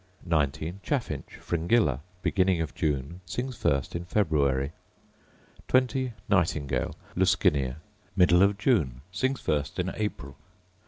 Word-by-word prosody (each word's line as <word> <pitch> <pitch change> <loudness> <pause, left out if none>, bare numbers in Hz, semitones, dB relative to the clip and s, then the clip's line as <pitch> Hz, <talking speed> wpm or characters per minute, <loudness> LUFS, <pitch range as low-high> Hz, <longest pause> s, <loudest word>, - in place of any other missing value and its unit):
19. 80 +2 0
Chaffinch, 120 - -3
Fringilla: 85 - +1 0.2
Beginning 95 -2 +2
of 80 -2 -2
June: 75 +4 -2
sings 125 +9 -4
first 70 -8 0
in 85 - -2
February. 70 -8 +1 1.0
20. 130 -1 +2
Nightingale, 80 -7 +1 0.2
Luscinia: 65 -3 +2 0.4
Middle 90 0 +5
of 100 +1 +4
June: 80 - +1
sings 130 +9 0
first 75 -2 -1
in - - -1
April. 75 -10 -4
85 Hz, 110 wpm, -28 LUFS, 70-105 Hz, 1.0 s, Middle